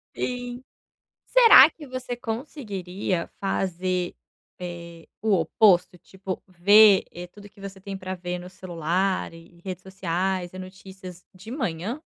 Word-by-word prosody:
Sim. 245 0 -4 0.6
Será 455 - +8
que 305 -1 -13
você 255 -1 -5
conseguiria 205 - -4
fazer, 185 -2 -2 0.4
eh, 170 -2 -9
o 215 -2 +1
oposto? 180 0 +3
Tipo, 190 +1 -7
ver, 200 +3 +6
eh, 175 +1 -8
tudo 205 +2 -15
que 200 - -22
você 195 -1 -9
tem 195 0 -7
pra 185 0 -5
ver 180 0 -5
no 180 +1 -10
celular 185 0 -2
e 165 +1 -16
redes 185 -2 -6
sociais 185 -1 -2
e 185 - -8
notícias 185 -1 -11
de 195 +5 -11
manhã? 200 - -3
190 Hz, 135 wpm, -25 LUFS, 180-210 Hz, 0.6 s, Será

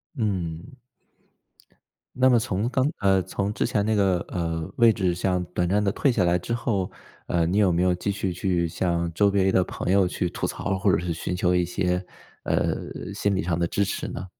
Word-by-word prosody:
嗯。 100 - -3 1.4
那 130 +1 +4
么 125 -2 +5
从 110 -1 -1
刚 130 0 +1
呃， 95 -1 +3
从 100 +2 -3
之 - - -1
前 100 - 0
那 110 - +1
个， 95 -4 +2
呃， 85 -2 -3
位置上 95 -5 +2
短 90 -1 +1
暂 105 +2 +2
地 100 -1 +1
退 135 - +2
下 105 -7 +1
来 85 0 +3
之 90 - -5
后， 110 -6 -1 0.4
呃， 85 -1 +1
你 90 +5 +1
有 100 -3 +4
没 85 +1 +1
有 90 -1 +3
继 90 +3 -2
续 100 -2 -2
去 90 -1 0
向 85 0 -1
周 100 +4 +4
围 95 -1 +2
的 95 - +4
朋 90 - -3
友 95 -2 +4
去 90 - -2
吐 85 - -5
槽 - - -6
儿， 95 - 0
或 100 +1 +2
者 - - +3
是 85 0 -2
寻 90 +2 -3
求 90 -1 +2
一 90 0 +2
些， 90 +1 -1 0.4
呃， - - +1 0.4
心 100 0 0
理 - - 0
上 85 -1 0
的 85 - 0
支 100 - +1
持 100 - -3
呢？ 90 - -6
95 Hz, 235 characters per minute, -25 LUFS, 90-100 Hz, 1.4 s, 么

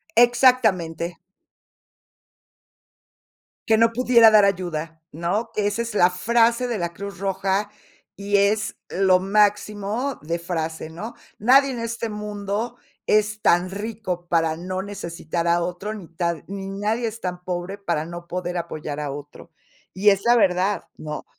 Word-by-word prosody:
Exactamente. 220 -9 +3 2.5
Que 220 - +4
no 230 +1 +4
pudiera 235 -2 +6
dar 210 -2 +7
ayuda, 165 -4 -2
¿no? 175 +8 -2
Que 210 -1 0
esa 205 +3 -1
es 230 - -6
la 180 -3 +5
frase 235 +6 +2
de 235 -2 -2
la 170 -1 -3
Cruz 200 +1 -8
Roja, 195 +1 -1 0.5
y 200 0 0
es, 205 +1 +1
lo 185 -1 +3
máximo 210 +5 0
de 165 +3 -2
frase, 165 -2 -4
¿no? 190 +9 -7 0.3
Nadie 270 +5 +5
en 245 - -5
este 230 0 -3
mundo, 210 +2 -4 0.3
es 210 0 +2
tan 175 0 +3
rico 205 -4 -5
para 165 -2 +1
no 185 +2 -4
necesitar 170 -4 -4
a 170 0 +3
otro. 180 +4 -4
ni 195 -6 -9
tan 170 -1 -3
ni 195 0 -6
nadie 215 +4 -1
es 225 +1 -6
tan 180 -1 -5
pobre, 180 +2 -4
para 170 -6 -2
no 170 +1 -8
poder 180 0 -3
apoyar 155 -3 -5
a 145 -2 -3
otro. 145 +4 -10 0.4
Y 205 +2 +4
es 195 -1 +3
la 240 +1 +6
verdad, 195 -1 +2
¿no? 150 -1 -6
195 Hz, 150 wpm, -23 LUFS, 175-215 Hz, 2.5 s, dar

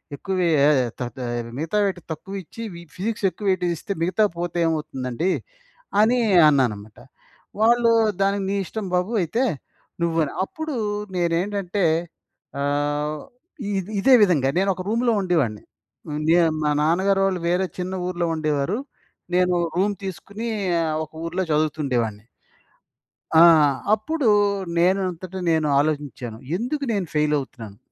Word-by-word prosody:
ఎక్కువే 185 +2 -1 0.2
ఏయ 145 -2 +5 0.2
తా 125 - -2 0.2
ఆహ్, 120 -1 -4
మిగతా 165 +7 -1
వాటికి 185 -3 -3
తక్కువ 195 +5 -10
ఇచ్చి 230 - -11
వి 170 - -9
ఫిజిక్స్ 210 +1 -2
ఎక్కువ 195 +4 -9
వెయిటేజ్ 180 -2 0
ఇస్తే, 200 - -4
మిగతా 185 +5 +2 0.2
పోతే 175 0 -2
ఏమవుతుందండి, 155 0 -2 0.7
అని 245 +3 +3 0.3
అన్నాననమాట. 110 -7 0 0.6
వాళ్ళు 235 +1 +4 0.3
దానికి, 195 0 +1
"నీ 200 - 0
ఇష్టం 215 +4 -5
బాబు 180 +5 0
అయితే," 230 +10 0 0.6
నువ్వు 165 -1 0
అని. - - -7
అప్పుడు 315 +1 -5 0.4
నేనేంటంటే 180 +2 0 0.8
ఆహ్, 145 +1 -1 0.6
ఇది 190 +2 -4
ఇదే 265 +6 +5
విధంగా 155 -9 +3
నేను 195 +1 +2
ఒక 185 - -6
రూమ్‌లో 235 +2 +1
ఉండేవాడిని. 150 - 0 0.7
నేను 170 -1 +5
మా 150 - +2
నాన్నగారోళ్ళు 190 +3 +2
వేరే 180 +2 +2
చిన్న 180 +1 -3
ఊర్లో 175 -1 -1
ఉండేవారు. 155 +5 0 0.6
నేను 180 0 +3 0.2
రూమ్ 200 +2 +1
తీసుకొని 200 +4 -6 0.4
ఆహ్, 155 -1 -1
ఒక - - -26
ఊర్లో 180 +3 -1
చదువుతుండేవాడిని. 130 -8 -1 1.1
ఆ! 160 - +7 0.5
అప్పుడు 260 +5 0 0.5
నేనంతట 185 0 0 0.2
నేను 160 -1 +2
ఆలోచించాను. 145 -6 -2 0.2
ఎందుకు 280 +6 -3
నేను 200 -4 -1
ఫెయిల్ 150 0 +2
అవుతున్నాను, 115 -7 -8
175 Hz, 125 wpm, -23 LUFS, 150-195 Hz, 1.1 s, ఆ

